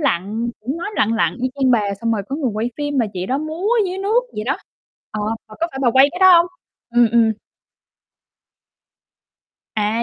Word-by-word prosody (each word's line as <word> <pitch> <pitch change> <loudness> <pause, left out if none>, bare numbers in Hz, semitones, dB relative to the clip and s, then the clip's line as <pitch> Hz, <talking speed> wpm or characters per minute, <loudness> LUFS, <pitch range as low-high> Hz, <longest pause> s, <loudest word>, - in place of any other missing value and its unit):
lặn, 225 - -1
cũng 265 +8 -4
mới 350 +5 -4
lặn 220 +2 +2
lặn 225 - +1
y 260 - +2
chang 265 -2 +2
bà, 205 -4 +2
xong 230 0 0
rồi 205 -3 -1
có 275 - -3
người 280 -6 -1
quay 225 +3 -1
phim 290 -2 -2
mà 230 - +2
chị 185 0 -4
đó 265 +2 0
múa 315 +6 -3 0.2
dưới 370 +1 -4
nước 420 +5 +2
vậy 210 - -4
đó. 275 - 0 0.5
Ờ, 215 - -4 0.3
mà 215 - -12
có 335 - +2
phải 270 - -7
bà 240 - +4
quay 265 +3 +6
cái 360 - -6
đó 375 0 +7
hông? 340 - +3 0.4
Ừm, 240 0 +5
ừm. 230 -2 +4 2.4
À, 215 +2 0
245 Hz, 205 wpm, -20 LUFS, 220-300 Hz, 2.4 s, đó